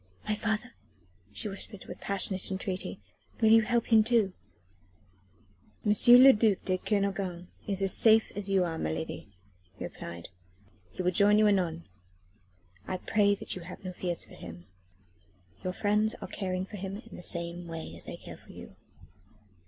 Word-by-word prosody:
"My 215 - +1
father?" 220 +3 -2 0.6
she 105 - -5
whispered 200 0 -8
with - - -10
passionate 195 -1 -1
entreaty. 190 - -4 0.4
"Will 220 -2 +4
you 225 0 +8
help 235 +1 0
him 220 -1 +7
too?" 220 -4 +2 1.5
"M. 210 - +3 0.2
le 255 +3 +10
duc 210 -3 +1
de 185 -1 0
Kernogan 195 -4 -2 0.2
is 195 -1 -1
as 195 - +3
safe 220 -1 +5
as 200 -1 -3
you 195 -2 +3
are, 165 -2 -3
my 80 - -1
lady," 80 - -5 0.5
he - - -6
replied. 85 0 -8 0.6
"He 185 - -5
will 180 - +2
join 205 +3 +5
you 215 - +5
anon. 175 -5 0 1.0
I 185 - -2
pray 205 +1 +2
you 185 - -3
have 180 +3 -10
no 185 -1 -5
fears 175 -1 -2
for - - -17
him. 85 0 -10 1.0
Your 185 - -1
friends 210 +2 +3
are - - -8
caring 185 -2 -3
for 205 - -9
him 195 +1 -5
in - - -11
the - - -9
same 170 0 -3
way 165 -1 -7
as - - -6
they - - -7
care - - -11
for - - -16
you." - - -12
195 Hz, 170 wpm, -29 LUFS, 180-215 Hz, 1.5 s, le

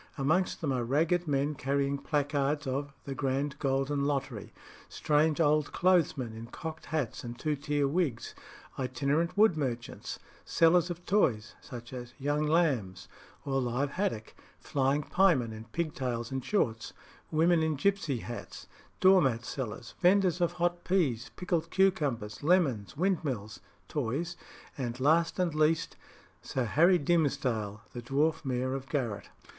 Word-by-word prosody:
Amongst 160 +7 +1
them 150 -4 0
are 125 -2 0
ragged 165 +7 +1
men 145 +1 +1
carrying 140 0 -1
placards 145 0 0
of 140 +2 -2
"The 140 - -5
Grand 135 +1 -2
Golden 135 +1 0
Lottery;" 135 -6 -2 0.4
strange 150 +1 +1
old 150 -2 +3
clothesmen 165 -10 +2
in 115 +1 -8
cocked 160 +5 -7
hats 150 -7 -2
and 120 -1 -7
two 155 +2 -1
tier 145 0 0
wigs; 140 -6 -1 0.5
itinerant 145 +7 0
wood 215 -4 +5
merchants; 120 -6 -4 0.3
sellers 170 +1 +3
of 175 0 -6
toys, 125 - +1
such 120 -2 -9
as 120 -1 -8
"young 145 +2 0
lambs" 130 - +1 0.4
or 135 -1 0
live 125 +3 -1
haddock; 180 - -2 0.3
flying 140 +1 0
piemen 150 -11 +2
in 110 0 -9
pig 155 +7 -3
tails 120 -2 -3
and 135 -1 -3
shorts; 115 - -1 0.4
women 165 +1 +3
in 160 -1 +1
gipsy 155 - 0
hats; 120 - -8 0.4
door 190 0 +7
mat 120 -4 0
sellers; 120 -3 -5
vendors 185 -1 +4
of 175 0 +2
hot 175 0 -1
peas, 145 -11 0
pickled 170 -2 -1
cucumbers, 145 - +1
lemons, 145 - +1
windmills 135 - -1 0.3
(toys); 150 +6 -2 0.4
and, 120 -1 -3
last 160 +5 +3
and 180 -4 0
least, 155 +1 +1 0.5
Sir 130 -2 -2
Harry 170 - +4
Dimsdale, 135 -10 0
the 120 - -5
dwarf 145 +7 0
Mayor 130 -1 -1
of 135 0 -5
Garratt. 120 -8 -2
145 Hz, 140 wpm, -30 LUFS, 125-165 Hz, 0.5 s, door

